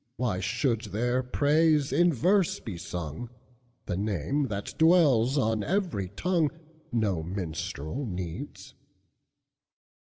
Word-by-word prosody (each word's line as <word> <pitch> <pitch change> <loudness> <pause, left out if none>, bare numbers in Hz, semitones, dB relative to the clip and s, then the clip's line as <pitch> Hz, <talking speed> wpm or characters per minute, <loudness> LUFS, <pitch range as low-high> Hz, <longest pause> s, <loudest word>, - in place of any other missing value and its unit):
Why 115 -8 0
should 115 +1 0
their 120 +5 0
praise 150 +3 +2
in 175 0 +4
verse 180 - +2
be 105 -6 -6
sung? 85 +4 -6 0.6
The 90 - -2
name, 105 - -1
that 100 -3 -4
dwells 150 -7 +5
on 110 -5 +1
every 175 - -1
tongue, 165 - +1 0.4
No 105 -8 0
minstrel 90 - -4
needs. 90 -4 -6
115 Hz, 105 wpm, -28 LUFS, 95-150 Hz, 0.6 s, dwells